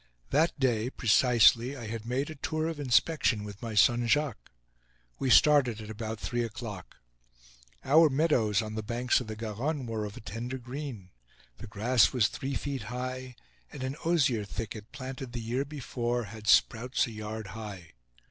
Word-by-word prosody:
That 155 Hz, +2 st, +2 dB
day 120 Hz, -3 st, +1 dB
precisely, 120 Hz, +2 st, +4 dB
I 120 Hz, -, -7 dB
had 110 Hz, +1 st, -6 dB
made 135 Hz, +5 st, -1 dB
a -, -, -8 dB
tour 155 Hz, +3 st, -2 dB
of 165 Hz, -2 st, -4 dB
inspection 130 Hz, -3 st, +2 dB
with 105 Hz, -1 st, -9 dB
my 115 Hz, -2 st, -5 dB
son, 120 Hz, +3 st, +4 dB
Jacques. 150 Hz, -3 st, 0 dB, 0.7 s
We 135 Hz, -, 0 dB
started 130 Hz, -5 st, +5 dB
at 110 Hz, 0 st, -8 dB
about 110 Hz, 0 st, -5 dB
three 120 Hz, +2 st, -2 dB
o'clock. 110 Hz, -5 st, -7 dB, 0.9 s
Our 155 Hz, +3 st, +6 dB
meadows 125 Hz, -, +2 dB
on 110 Hz, 0 st, -6 dB
the 110 Hz, -, -3 dB
banks 120 Hz, +4 st, +1 dB
of 125 Hz, -, -8 dB
the 110 Hz, -, -5 dB
Garonne 120 Hz, +7 st, -3 dB
were 110 Hz, -2 st, -3 dB
of 105 Hz, -, -8 dB
a -, -, -9 dB
tender 120 Hz, +4 st, -5 dB
green. 125 Hz, -6 st, -7 dB, 0.5 s
The -, -, -8 dB
grass 115 Hz, +3 st, +3 dB
was 115 Hz, -6 st, +3 dB
three 135 Hz, 0 st, -4 dB
feet 135 Hz, -1 st, -4 dB
high, 130 Hz, +1 st, -5 dB, 0.4 s
and -, -, -7 dB
an 130 Hz, +1 st, -3 dB
osier 140 Hz, -10 st, +2 dB
thicket, 105 Hz, +1 st, -6 dB
planted 130 Hz, -2 st, -7 dB
the 120 Hz, -, -3 dB
year 120 Hz, +4 st, -2 dB
before, 120 Hz, -4 st, -3 dB
had 110 Hz, 0 st, -10 dB
sprouts 120 Hz, +4 st, +3 dB
a 120 Hz, -, -8 dB
yard 110 Hz, -1 st, -6 dB
high. 100 Hz, -6 st, -8 dB
120 Hz, 170 wpm, -29 LUFS, 110-135 Hz, 0.9 s, Our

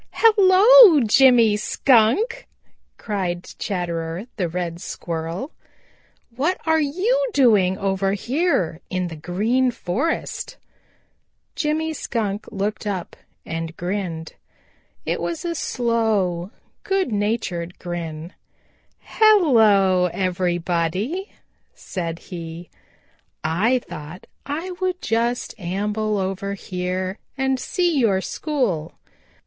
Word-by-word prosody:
"Hello, 420 Hz, -2 st, +7 dB
Jimmy 235 Hz, -1 st, +5 dB
Skunk," 270 Hz, -, +2 dB, 0.5 s
cried 185 Hz, -5 st, -3 dB, 0.2 s
Chatterer 170 Hz, -1 st, -3 dB
the 180 Hz, -4 st, -1 dB
Red 170 Hz, 0 st, -4 dB
Squirrel. 165 Hz, -, -5 dB, 0.8 s
"What 315 Hz, +9 st, 0 dB
are 320 Hz, -1 st, +3 dB
you 435 Hz, -, +1 dB
doing 205 Hz, -8 st, +4 dB
over 195 Hz, -1 st, 0 dB
here 220 Hz, -, 0 dB
in 185 Hz, -1 st, -2 dB
the 165 Hz, -, -7 dB
Green 215 Hz, +11 st, 0 dB
Forest?" 245 Hz, -, -3 dB, 1.0 s
Jimmy 315 Hz, 0 st, -1 dB
Skunk 215 Hz, -8 st, -3 dB
looked 210 Hz, +2 st, -3 dB
up 190 Hz, -4 st, -4 dB, 0.3 s
and 165 Hz, 0 st, -5 dB
grinned. 175 Hz, -3 st, -4 dB, 0.7 s
It -, -, -2 dB
was 335 Hz, -1 st, -4 dB
a 340 Hz, -, -1 dB
slow, 220 Hz, -, 0 dB, 0.3 s
good 385 Hz, -, 0 dB
natured 205 Hz, -5 st, -2 dB
grin. 170 Hz, -1 st, -6 dB, 0.7 s
"Hello, 220 Hz, -, +4 dB
everybody," 180 Hz, -, -1 dB, 0.4 s
said 170 Hz, -3 st, -5 dB
he. 170 Hz, -1 st, -9 dB, 0.7 s
"I 195 Hz, +11 st, +2 dB
thought 155 Hz, +4 st, -9 dB, 0.2 s
I 320 Hz, +6 st, -3 dB
would 370 Hz, -1 st, -1 dB
just 235 Hz, -1 st, -1 dB
amble 210 Hz, +4 st, -2 dB
over 195 Hz, +1 st, -3 dB
here 185 Hz, +1 st, -4 dB, 0.2 s
and 265 Hz, -1 st, 0 dB
see 345 Hz, -2 st, 0 dB
your 205 Hz, -6 st, +3 dB
school. 210 Hz, -, -2 dB
205 Hz, 95 wpm, -22 LUFS, 180-275 Hz, 1.0 s, Hello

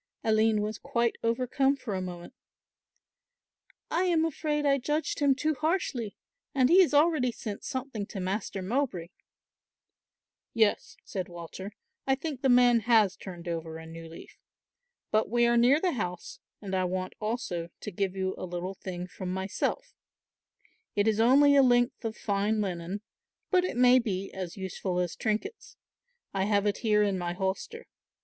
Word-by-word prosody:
Aline 220 Hz, -1 st, +3 dB
was 210 Hz, 0 st, -4 dB
quite 235 Hz, -1 st, 0 dB
overcome 255 Hz, +4 st, +1 dB
for 255 Hz, -6 st, -6 dB
a 190 Hz, -, -2 dB
moment. 175 Hz, +2 st, -7 dB, 1.6 s
"I 355 Hz, +3 st, +2 dB
am 330 Hz, -3 st, +3 dB
afraid 300 Hz, -2 st, -1 dB
I 275 Hz, -1 st, +3 dB
judged 295 Hz, +4 st, -1 dB
him 280 Hz, -2 st, +4 dB
too 310 Hz, +3 st, 0 dB
harshly, 305 Hz, -, -1 dB, 0.4 s
and 260 Hz, -1 st, +4 dB
he 370 Hz, +3 st, +8 dB
has 360 Hz, -, +3 dB
already 290 Hz, -4 st, +3 dB
sent 210 Hz, -3 st, -6 dB
something 260 Hz, -6 st, -4 dB
to 200 Hz, -, -6 dB
Master 190 Hz, +1 st, -3 dB
Mowbray." 200 Hz, -6 st, -1 dB, 1.5 s
"Yes," 220 Hz, -3 st, +1 dB
said 185 Hz, -3 st, -4 dB
Walter, 175 Hz, +4 st, -8 dB, 0.3 s
"I 270 Hz, -, +4 dB
think 280 Hz, -2 st, -5 dB
the 270 Hz, -, +2 dB
man 245 Hz, -1 st, +6 dB
has 220 Hz, -4 st, +3 dB
turned 180 Hz, -3 st, -9 dB
over 165 Hz, -1 st, -4 dB
a 160 Hz, -, -10 dB
new 165 Hz, 0 st, -9 dB
leaf. 165 Hz, -, -13 dB, 0.7 s
But 215 Hz, -1 st, +2 dB
we 240 Hz, +1 st, +3 dB
are 235 Hz, 0 st, +3 dB
near 245 Hz, +5 st, +5 dB
the 360 Hz, +1 st, +1 dB
house 180 Hz, -, -5 dB, 0.2 s
and 195 Hz, -1 st, -5 dB
I 185 Hz, -1 st, +2 dB
want 185 Hz, +1 st, -3 dB
also 210 Hz, -7 st, -3 dB
to 210 Hz, -, -5 dB
give 195 Hz, +1 st, -2 dB
you 190 Hz, 0 st, -1 dB
a -, -, -5 dB
little 180 Hz, +2 st, -4 dB
thing 180 Hz, -2 st, -6 dB
from 180 Hz, 0 st, -6 dB
myself; 190 Hz, -, -2 dB, 1.0 s
it 205 Hz, +1 st, +2 dB
is 220 Hz, -1 st, +2 dB
only 280 Hz, +5 st, +6 dB
a 280 Hz, -, +7 dB
length 245 Hz, 0 st, +3 dB
of 225 Hz, -1 st, -4 dB
fine 205 Hz, +1 st, 0 dB
linen, 185 Hz, 0 st, -3 dB, 0.5 s
but 365 Hz, -2 st, +4 dB
it 365 Hz, -, -3 dB
may 250 Hz, +1 st, +6 dB
be 195 Hz, -5 st, -3 dB
as 185 Hz, -2 st, -6 dB
useful 190 Hz, -1 st, -3 dB
as 180 Hz, -1 st, -1 dB
trinkets. 225 Hz, -, -3 dB, 0.6 s
I 195 Hz, -1 st, 0 dB
have 205 Hz, -1 st, +2 dB
it 205 Hz, -1 st, +1 dB
here 210 Hz, -2 st, +3 dB
in 200 Hz, -2 st, 0 dB
my 175 Hz, 0 st, -2 dB
holster. 190 Hz, +1 st, -3 dB
215 Hz, 165 wpm, -29 LUFS, 190-260 Hz, 1.6 s, he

